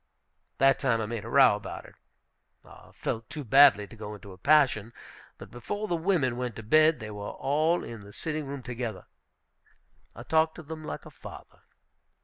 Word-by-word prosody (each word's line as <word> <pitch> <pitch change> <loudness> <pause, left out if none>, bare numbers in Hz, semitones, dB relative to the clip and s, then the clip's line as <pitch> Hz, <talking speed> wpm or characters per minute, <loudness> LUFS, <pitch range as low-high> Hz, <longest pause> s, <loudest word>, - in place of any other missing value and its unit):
That 135 0 +4
time 125 -5 +1
I 110 - -1
made 110 -1 -5
a - - -7
row 130 -4 +6
about 105 - -8
it. - - -15 0.7
I - - -16
felt 115 0 -5
too 150 - -6
badly 135 -4 +6
to 115 - -14
go 105 -1 -7
into 100 -1 -12
a 90 - -12
passion. 125 -5 +3 0.4
But - - -12
before 205 - -5
the 175 - 0
women 160 -8 0
went 125 -3 -4
to 110 - -8
bed, 155 +6 +4
they 110 -2 -7
were 105 0 -6
all 155 +5 0
in 115 - -8
the 100 0 -13
sitting 155 +5 -4
room 140 -1 -6
together, 120 -5 -5 1.1
I 120 - -9
talked 160 +3 +2
to 175 - -10
them 155 +1 -8
like - - -6
a - - -11
father. - - -12
125 Hz, 190 wpm, -28 LUFS, 110-155 Hz, 1.1 s, row